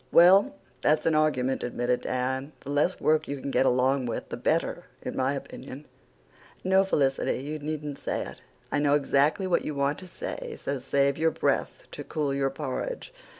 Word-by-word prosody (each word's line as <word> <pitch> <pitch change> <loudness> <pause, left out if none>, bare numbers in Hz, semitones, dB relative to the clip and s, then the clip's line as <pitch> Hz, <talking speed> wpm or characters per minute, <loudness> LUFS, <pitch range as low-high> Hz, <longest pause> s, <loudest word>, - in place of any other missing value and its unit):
"Well, 195 +11 +7 0.3
that's 150 +2 +2
an 165 - +3
argument," 140 -4 +2
admitted 120 0 0
Dan. 130 +3 -2
"The 140 - -6
less 150 +6 +1
work 155 0 +2
you 140 -1 -4
can 140 - -4
get 135 - +3
along 130 +1 +2
with 115 - -4
the - - -3
better, - - 0 0.2
in - - -4
my 130 +2 +1
opinion. 135 +1 -8 0.8
No, 190 +1 +4
Felicity, 135 -8 +1
you 150 +4 -5
needn't 150 -1 -4
say - - -2
it. - - -10 0.3
I - - +1
know 145 0 +3
exactly 145 +6 +2
what 180 -2 +1
you 150 - -4
want 140 +1 0
to 185 - -10
say, 475 - -6
so 140 -1 -2
save 140 +2 +1
your 160 0 +4
breath - - -1
to - - -6
cool 145 -3 -1
your 135 0 +1
porridge. 160 - -4
145 Hz, 185 wpm, -27 LUFS, 135-155 Hz, 0.8 s, Well